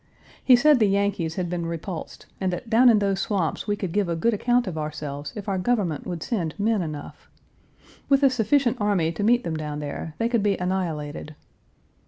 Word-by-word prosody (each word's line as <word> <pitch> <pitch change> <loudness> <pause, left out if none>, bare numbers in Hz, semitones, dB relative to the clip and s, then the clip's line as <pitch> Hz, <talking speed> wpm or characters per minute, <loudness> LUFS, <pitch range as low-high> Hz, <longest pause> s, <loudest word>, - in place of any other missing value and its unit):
He 255 - +7
said 285 +2 +5
the 215 - +4
Yankees 195 -5 0
had 180 -2 -2
been 170 -1 -3
repulsed, 170 +1 -6 0.2
and 190 -1 +1
that 220 +6 -6
down 245 +3 +6
in 225 - +6
those 200 -2 0
swamps 195 -4 -1
we 205 - +1
could 190 -4 -4
give 200 -1 0
a 170 - 0
good 230 +8 +1
account 245 +4 +2
of 185 -5 -5
ourselves 150 -2 -5
if 210 -2 -7
our 195 -2 0
government 185 - -1
would 170 -3 -4
send 175 -7 -3
men 215 0 +1
enough. 155 -3 -7 0.8
With 275 0 +4
a 270 - +6
sufficient 245 0 +1
army 195 -6 +1
to 165 - -5
meet 240 +3 +3
them 165 -5 -3
down 150 -1 -4
there, 150 +1 -6
they 230 - +1
could 235 -2 +1
be 200 -1 +1
annihilated. 160 -5 -3
190 Hz, 205 wpm, -24 LUFS, 160-225 Hz, 0.8 s, He